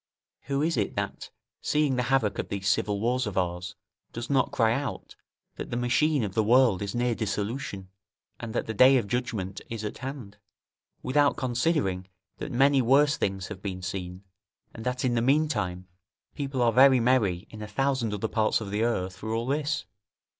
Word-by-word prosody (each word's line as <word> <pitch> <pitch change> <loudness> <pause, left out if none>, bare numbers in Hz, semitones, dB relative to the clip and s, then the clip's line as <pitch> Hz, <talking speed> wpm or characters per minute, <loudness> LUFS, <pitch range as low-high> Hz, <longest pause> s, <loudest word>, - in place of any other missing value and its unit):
Who 140 +1 0
is 165 -2 0
it 105 - -1
that, - - -4 0.3
seeing 150 -3 +1
the 125 - +1
havoc 115 -7 +1
of - - -3
these 100 -1 -3
civil 100 0 +1
wars 125 +2 0
of 100 - -5
ours, 90 +1 -2 0.4
does 120 +3 -5
not 135 0 +2
cry 115 -5 +2
out, 140 +3 -4 0.4
that - - -6
the 120 - -2
machine 135 +3 +2
of 100 -3 -3
the 110 - +2
world 115 -3 +4
is 100 +2 -4
near 120 0 +1
dissolution, 105 -2 -3 0.5
and 115 - -6
that - - 0
the 110 - -4
day 130 +5 +6
of 120 - 0
judgment 110 -6 -3
is 115 -2 -5
at 105 - -5
hand; 130 -6 -7 0.7
without 145 +2 +2
considering, 120 - 0 0.3
that - - -5
many 135 +2 +4
worse 140 +4 +4
things 95 -1 -2
have 100 -3 -8
been 95 -2 -5
seen, 90 0 -5 0.5
and 110 - -8
that 125 +1 -1
in 125 - +1
the 115 - +1
meantime, 115 -10 0 0.5
people 135 -3 -2
are 115 -1 +3
very 130 +1 +7
merry 110 -7 +2
in 110 - -9
a 105 - -5
thousand 130 +1 0
other 105 +2 -2
parts 110 0 +1
of 105 -3 -6
the 105 +1 -1
earth 95 -6 -1
for 110 +3 -5
all 115 +1 -1
this? 150 +3 -1
115 Hz, 190 wpm, -27 LUFS, 100-135 Hz, 0.7 s, very